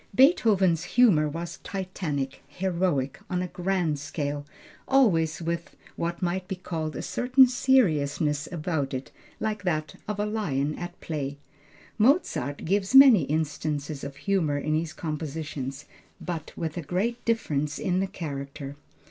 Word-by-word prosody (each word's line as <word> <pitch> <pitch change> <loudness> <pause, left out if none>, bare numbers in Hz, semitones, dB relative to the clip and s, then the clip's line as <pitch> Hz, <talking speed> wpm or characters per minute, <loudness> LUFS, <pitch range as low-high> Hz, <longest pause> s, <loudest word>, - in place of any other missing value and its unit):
Beethoven's 200 - +4
humor 175 -12 +6
was 165 +3 -6
titanic, 170 -8 -4
heroic, 175 -7 -1
on 180 -1 0
a - - -3
grand 175 -4 -1
scale, 145 0 -4 0.4
always 170 -12 +3
with 170 0 -3 0.2
what 170 +2 -3
might 180 +1 -1
be 190 - -3
called 160 -4 -4
a - - -4
certain 260 +2 +5
seriousness 155 - +2
about 155 -5 -2
it 130 +1 -6 0.3
like 215 -2 -2
that 155 -5 -1
of 210 -1 -3
a 210 - +1
lion 155 -10 -1
at 175 +2 -7
play. 145 -3 -3 0.6
Mozart 210 - +2
gives 195 +6 +1
many 260 - +9
instances 150 -1 -2
of 140 0 -6
humor 160 -3 0
in 155 +2 -1
his 160 +1 0
compositions, 150 -3 -5 0.3
but 165 -3 -5
with 160 0 -3
a - - -1
great 200 +10 -2
difference 150 -11 0
in 185 0 0
the 195 - 0
character. 140 -4 -6
165 Hz, 140 wpm, -27 LUFS, 145-190 Hz, 0.6 s, many